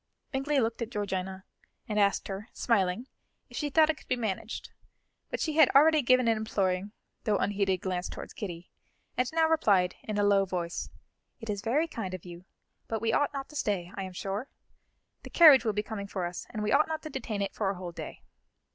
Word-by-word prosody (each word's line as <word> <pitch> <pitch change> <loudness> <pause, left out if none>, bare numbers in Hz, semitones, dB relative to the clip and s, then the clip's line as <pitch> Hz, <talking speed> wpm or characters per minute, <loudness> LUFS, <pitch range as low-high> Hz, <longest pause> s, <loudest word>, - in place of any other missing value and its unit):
Bingley 275 +1 +1
looked 230 -1 -1
at 230 - -2
Georgiana 190 -3 -3 0.4
and 210 -1 0
asked 200 -1 +2
her, 200 +3 -6
smiling, 205 0 +1 0.5
if - - -8
she 295 - -1
thought 315 +2 +5
it 310 - -9
could - - -17
be 255 - +1
managed, 220 -6 -4 0.6
but - - -3
she 310 -1 -1
had 315 - +7
already 310 +2 +7
given 255 -1 +4
an 225 -1 +3
imploring, 195 -2 -1 0.3
though 210 - +2
unheeded, 195 -3 0
glance 180 -1 -2
towards - - -8
Kitty, 175 -4 -7 0.4
and 250 0 0
now 320 0 +3
replied, 200 - +3
in 215 -1 -4
a 205 - +2
low 200 -1 +4
voice: 175 -3 -3 0.5
"It 225 -3 -4
is 200 -1 -3
very 280 +10 +1
kind 195 - -4
of 185 - -11
you, 175 0 -10 0.4
but 225 - -2
we 225 +1 0
ought 290 - +2
not 275 -1 -5
to 300 - -13
stay, 190 -9 -1
I 200 - -5
am 190 -1 -6
sure. 200 +8 -4 0.7
The - - -10
carriage 300 -7 +8
will 220 - +3
be 210 +1 -1
coming 210 -2 -5
for 190 -3 -3
us, 175 0 -6
and 215 - -4
we 210 - 0
ought 295 +5 +4
not 315 -1 -4
to 310 - -7
detain 215 -6 -3
it 195 - -3
for 200 -3 -1
a 195 - -2
whole 180 -1 -6
day." - - -8
210 Hz, 215 wpm, -29 LUFS, 190-255 Hz, 0.7 s, carriage